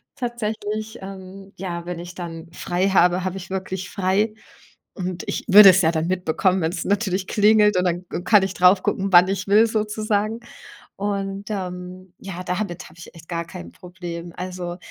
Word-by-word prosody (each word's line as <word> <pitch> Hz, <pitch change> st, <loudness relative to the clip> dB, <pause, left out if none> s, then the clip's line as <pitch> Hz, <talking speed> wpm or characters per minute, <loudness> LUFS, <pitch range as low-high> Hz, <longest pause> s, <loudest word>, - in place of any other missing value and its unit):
Tatsächlich, 220 Hz, -3 st, -4 dB
ähm, 195 Hz, 0 st, -10 dB
ja, 175 Hz, -2 st, -5 dB
wenn 175 Hz, -1 st, -5 dB
ich 175 Hz, 0 st, -9 dB
dann 165 Hz, -2 st, -7 dB
frei 180 Hz, +2 st, -1 dB
habe, 180 Hz, -1 st, +3 dB
habe 185 Hz, 0 st, -3 dB
ich 175 Hz, -1 st, -9 dB
wirklich 190 Hz, -1 st, -4 dB
frei. 200 Hz, +3 st, 0 dB, 0.6 s
Und 185 Hz, -3 st, -5 dB
ich -, -, -3 dB
würde 205 Hz, 0 st, +10 dB
es 190 Hz, +1 st, +5 dB
ja 160 Hz, -, +3 dB
dann 160 Hz, +1 st, -1 dB
mitbekommen, 185 Hz, +1 st, +1 dB
wenn 160 Hz, +1 st, 0 dB
es 165 Hz, -, -3 dB
natürlich 195 Hz, -2 st, 0 dB
klingelt 210 Hz, -1 st, +4 dB
und 180 Hz, -, +2 dB
dann 175 Hz, +1 st, -1 dB
k -, -, -4 dB
kann 210 Hz, -2 st, +5 dB
ich 190 Hz, 0 st, -2 dB
drauf 185 Hz, +1 st, +4 dB
gucken, 195 Hz, 0 st, -1 dB
wann 180 Hz, +1 st, +8 dB
ich 195 Hz, 0 st, -2 dB
will 210 Hz, +3 st, +6 dB
sozusagen. 215 Hz, 0 st, -1 dB, 0.5 s
Und, 200 Hz, 0 st, -3 dB
ähm, 185 Hz, -2 st, -6 dB
ja, 190 Hz, -2 st, -7 dB
damit 180 Hz, -1 st, -3 dB
habe 160 Hz, -, -19 dB
ich 170 Hz, -, -12 dB
echt 165 Hz, -1 st, -15 dB
gar 170 Hz, -1 st, -2 dB
kein 85 Hz, -, -10 dB
Problem. 175 Hz, -1 st, -8 dB
Also, 180 Hz, -1 st, -5 dB
185 Hz, 180 wpm, -22 LUFS, 175-205 Hz, 0.6 s, würde